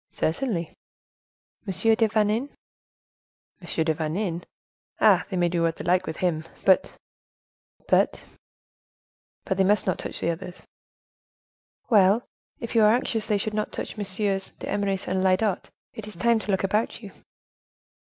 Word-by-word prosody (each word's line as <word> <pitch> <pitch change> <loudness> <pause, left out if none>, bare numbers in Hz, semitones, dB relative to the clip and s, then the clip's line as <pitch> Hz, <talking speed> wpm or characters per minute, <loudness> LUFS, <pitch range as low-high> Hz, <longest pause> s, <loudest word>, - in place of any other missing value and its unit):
"Certainly." 170 -1 -1 1.0
"M. - - -1 0.2
de 225 0 +3
Vanin?" 215 +5 +1 1.1
"M. 170 -2 -2
de 160 - +2
Vanin! 170 +3 -2 0.6
ah! - - +5
they 190 - -3
may 175 -1 +3
do 170 0 -1
what 165 -1 +1
they - - -7
like 180 +1 +2
with 160 - -4
him, 165 -4 0 0.2
but—" 190 -1 +3 0.9
"But—" - - +2 1.2
"But 190 - -1
they 195 - +4
must 200 +1 +3
not 185 - 0
touch - - -5
the 170 - 0
others!" 180 +2 -8 1.3
"Well, 205 +2 +5 0.4
if 230 - -6
you 230 - +4
are 215 +1 +6
anxious 225 -3 -1
they 210 -2 +2
should 215 +2 -3
not 215 0 -2
touch - - -5
MM. 195 -1 -2
d'Eymeris 195 -2 -2
and 185 0 0
Lyodot, 190 +1 +1 0.2
it 215 -1 -8
is 210 - -9
time 230 +6 +2
to 215 - -9
look 190 -1 +1
about 210 +4 -1
you." 200 - -9
195 Hz, 150 wpm, -25 LUFS, 180-215 Hz, 1.3 s, are